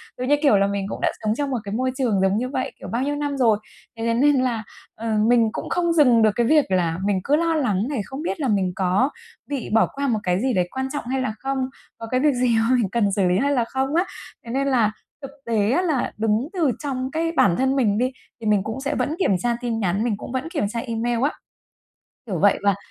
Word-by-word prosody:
Ừ, 250 - -5
như 290 +3 +4
kiểu 275 -9 +5
là 195 0 +3
mình 200 -1 -2
cũng - - -6
đã - - +2
sống 215 0 +1
trong 285 +2 -2
một 260 - -1
cái 200 -1 -5
môi 255 +3 0
trường 230 -8 +1
giống 195 +1 +2
như 250 +3 -2
vậy, 260 -1 -2
kiểu, - - -8
bao 235 +2 -2
nhiêu 290 +2 -1
năm 290 -1 -2
rồi, 230 -5 +4 0.4
thế 225 - -3
thế 230 - +2
nên 285 +5 +4
là, 250 -4 0 0.3
ờ, 225 -1 -2
mình 235 -2 +4
cũng - - -5
không 345 -1 +1
dừng 250 -8 +5
được 220 - +5
cái 235 - +2
việc 300 +1 +4
là 170 -3 +1
mình 200 -2 +1
cứ 290 - +2
lo 330 +1 +1
lắng 220 -8 0
này 275 -7 -1
không 270 +6 -7
biết 335 - -3
là 280 - 0
mình 195 -5 +1
có 190 +8 +2 0.4
bị 280 -5 -3
bỏ 225 - +4
qua 280 0 -2
một 225 -4 +1
cái 180 -1 +1
gì 260 -1 +1
đấy 180 -3 +1
quan 265 0 -2
trọng 290 - -4
hay 265 +1 -1
là 255 -4 -2
không? 270 0 -2 0.4
Có 225 - -7
cái 255 - +2
việc 295 +1 +3
gì 245 -2 +2
mà 230 +3 +3
mình 230 -6 +1
cần 205 -1 +1
xử 195 -1 +1
lý 180 +1 +2
hay 280 +6 +1
là 245 -4 +1
không 265 +4 -2
á? 350 +3 +3 0.4
Thế 230 - -6
nên 275 +2 0
là 235 -6 +3 0.3
thực 275 -1 -8
tế 220 -2 +1
á 320 +8 +2
là 310 -8 0
đứng 220 +4 +1
từ 330 -8 +2
trong 260 -2 -3
cái 330 +2 -1
bản 200 - +3
thân 265 +1 +1
mình 215 -7 +2
đi 250 +3 +1 0.3
thì - - -7
mình 205 -2 +3
cũng 220 +6 -5
sẽ 285 +2 -2
vẫn 305 - -1
kiểm 195 - +2
tra 240 +6 0
tin 235 -2 -2
nhắn, 195 0 0
mình 230 -4 0
cũng 240 - -8
vẫn 260 +5 -3
kiểm 300 - -1
tra 230 +2 -3
email 235 0 -2
á. 285 - +2 0.9
Kiểu 190 -7 -3
vậy, 200 +3 +4
và 200 -1 +3
245 Hz, 270 wpm, -23 LUFS, 215-275 Hz, 0.9 s, kiểu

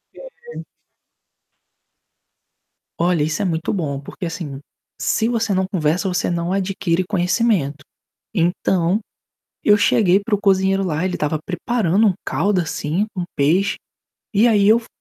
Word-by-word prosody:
É, - - -12 0.3
é. - - -6 2.3
Olha, 170 -3 +2
isso 155 +5 -1
é - - 0
muito 160 -3 -1
bom, 145 -7 -2
porque, 145 - -8
assim, 160 -5 -5 0.4
se 225 - +1
você 225 -4 0
não 190 0 +1
conversa, 180 0 0
você 180 -1 0
não 170 +1 -2
adquire 185 -2 0
conhecimento. 180 -7 0 0.5
Então, 180 +1 +1 0.7
eu 210 0 +6
cheguei 200 -2 +3
para 210 +1 -1
o 205 - -1
cozinheiro 195 -1 +2
lá, 160 -1 -1
ele 185 -1 -1
estava 150 +1 -1
preparando 200 +1 +1
um 195 - +3
caldo, 200 -2 +1
assim, 165 +4 -2
com 180 -3 -2
peixe, 165 +8 +2 0.6
e 210 +4 +5
aí 205 -3 +4
eu 220 +2 +6
fu 230 - -12
185 Hz, 145 wpm, -20 LUFS, 165-205 Hz, 2.3 s, eu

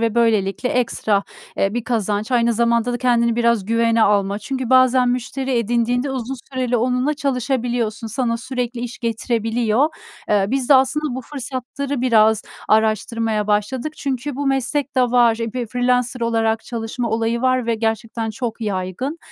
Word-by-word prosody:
ve 230 -1 0
böylelikle 225 0 +1
ekstra, 220 -4 +1 0.3
eee, 195 +3 0
bir 240 -2 -2
kazanç 215 -1 -1
aynı 235 -1 +3
zamanda 235 +1 +1
da 240 - -2
kendini 235 -2 +2
biraz 235 -4 +2
güvene 230 +1 +2
alma. 200 -1 +2
Çünkü 260 +1 -4
bazen 255 -1 +5
müşteri 255 +2 -2
edindiğinde 240 +3 0
uzun 260 0 -3 0.2
süreli 255 -2 0
onunla 250 +5 +1
çalışabiliyorsun, 245 -5 -1
sana 230 0 -1
sürekli 245 -1 -4
iş 245 0 -6
getirebiliyor. 230 +2 0 0.4
Eee, 205 -2 +3
biz 265 0 -1
de 285 - +7
aslında 265 +1 +2
bu 260 - -4
fırsatları 270 +1 -5
biraz 220 -3 +4 0.3
araştırmaya 220 0 +1
başladık. 235 +8 -1
Çünkü 270 0 -3
bu 285 0 -2
meslekte 270 0 0
var, 240 -2 +4
eee, 230 -1 -3
f 245 0 -3
freelancer 250 +1 0
olarak 225 -1 0
çalışma 230 +1 -4
olayı 230 +1 0
var 255 -2 +2
ve 230 - +1
gerçekten 225 0 -2
çok 230 +1 -5
yaygın. 205 - -3
235 Hz, 150 wpm, -20 LUFS, 225-255 Hz, 0.4 s, de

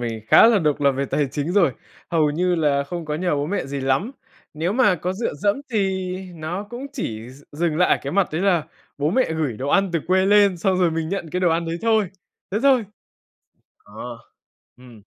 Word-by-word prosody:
mình 115 -2 -4
khá 170 - +7
là 230 -3 +5
độc 150 -5 0
lập 140 -1 +4
về 135 +1 -2
tài 140 0 -1
chính 150 +3 -2
rồi, 175 -8 +3 0.4
hầu 155 -3 +2
như 180 +4 +1
là 145 -4 +1
không 170 +3 -6
có 150 -1 -3
nhờ 175 -1 0
bố 145 +1 -1
mẹ 195 -6 -2
gì 140 0 -4
lắm. 135 - 0 0.4
Nếu 165 +5 -1
mà 225 -5 +4
có 180 +2 -3
dựa 210 -1 -3
dẫm 200 - +1 0.2
thì 190 -3 -1 0.2
nó 165 +4 -4
cũng 245 +3 -6
chỉ 115 - -5
d 135 +3 -16
dừng 160 +1 -1
lại 180 +2 +3
cái 140 - -4
mặt 195 0 +2
đấy 160 - -1
là 175 -6 +2 0.3
bố 145 +2 +1
mẹ 255 -5 +1
gửi 150 -8 -2
đồ 135 +2 -4
ăn 195 +3 +2
từ 165 - 0
quê 185 +1 +3
lên, 200 -2 +5
xong 185 +2 0
rồi 175 -2 +3
mình 160 0 -2
nhận 180 -3 -4
cái 180 - -2
đồ 180 - +3
ăn 165 +1 0
đấy 165 0 -2
thôi, 220 -3 +2 0.4
thế 200 - 0
thôi. 265 -4 +4 0.9
Ờ, 105 - -22 0.9
ừm. 125 -4 -15
170 Hz, 220 wpm, -22 LUFS, 145-195 Hz, 0.9 s, khá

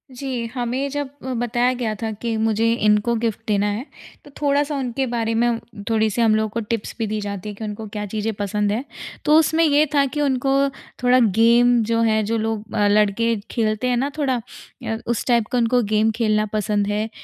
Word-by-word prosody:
जी, 250 -2 -3
हमें 255 +2 -2
जब 290 0 -3
अ, 260 0 -3
बताया 245 +1 +1
गया 220 -3 -1
था 225 -1 -2
कि 225 +2 -3
मुझे 225 +1 +1
इनको 210 +1 +2
ग़िफ़्ट 225 -2 -1
देना 205 -1 +1
है। 220 +6 -4 0.4
तो 290 - -14
थोड़ा-सा 290 +1 +1
उनके 265 -1 -2
बारे 230 -1 -1
में 235 0 +1 0.3
थोड़ी-सी 220 0 +1
हम 220 -2 +4
लोगों 220 0 0
को 225 - -3
टिप्स 225 -1 -4
भी 225 - -1
दी 215 +1 -2
जाती 200 0 -5
है 205 - -7
कि 220 - -8
उनको 215 0 -5
क्या 210 0 -5
चीज़ें 215 +1 -1
पसंद 205 0 -1
है। 225 +5 -1 0.4
तो 300 +1 +6
उसमें 320 +1 +2
ये 300 -1 +4
था 280 -1 +4
कि 295 +2 -3
उनको 270 -1 +1 0.5
थोड़ा 250 +1 +5
गेम 235 +2 +4
जो 230 +1 0
है 220 -1 +2
जो 225 +2 -1
लोग 220 -1 -3
अ, 205 -2 +3
लड़के 210 +3 +2 0.2
खेलते 220 +1 0
हैं 245 - +1
ना 270 +4 0
थोड़ा 260 -5 0 0.5
अ, 225 - -1
उस 235 -2 -1
टाइप 235 -3 +2
का 250 - +1
उनको 240 +1 +3
गेम 220 +1 +3
खेलना 215 -2 +1
पसंद 205 -1 0
है। 210 +2 -1
230 Hz, 210 wpm, -21 LUFS, 215-250 Hz, 0.5 s, तो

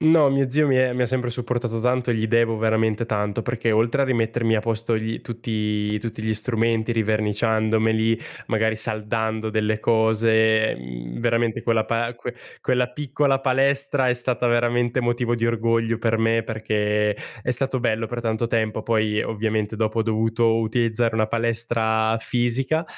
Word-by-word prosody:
No, 155 -2 +5
mio 135 -1 +1
zio 150 +4 +2
mi 135 - +3
è 130 -1 +3
mi 125 0 0
ha - - +2
sempre 125 0 -1
supportato 120 -1 -2
tanto, 125 +1 0
gli 110 -1 0
devo 115 0 +2
veramente 110 0 +1
tanto 105 -1 -1
perché 120 -1 -1
oltre 115 +4 +2
a - - +3
rimettermi 115 -2 +1
a - - +1
posto 115 +1 -1
gli 110 +1 -3
tutti 105 -2 -2
tutti 110 0 -5
gli 110 0 0
strumenti 115 0 0
riverniciandomeli, 110 0 +1 0.3
magari 110 0 +1
saldando 110 0 -2
delle 110 0 0
cose, 110 0 +3
mhmm, - - -8
veramente 115 -1 0
quella 115 -2 +1
pal 115 +1 -2 0.4
quella 125 -1 +1
piccola 140 +1 0
palestra 135 0 +1
è - - +4
stata 125 0 -1
veramente 120 +1 +1
motivo 120 0 0
di 115 0 0
orgoglio 115 0 0
per 115 -1 0
me, 115 0 +2
perché 105 -1 0 0.3
è 125 - -1
stato 130 +1 0
bello 115 -2 0
per 120 +1 -4
tanto 115 0 -1
tempo. 110 -1 -1
Poi 110 -2 +1
ovviamente 110 0 -2
dopo 110 +1 -1
ho - - +2
dovuto 115 +1 +1
utilizzare 115 0 0
una 110 -1 +1
palestra 115 -1 0
fisica, 130 +7 0
115 Hz, 160 wpm, -23 LUFS, 110-120 Hz, 0.4 s, No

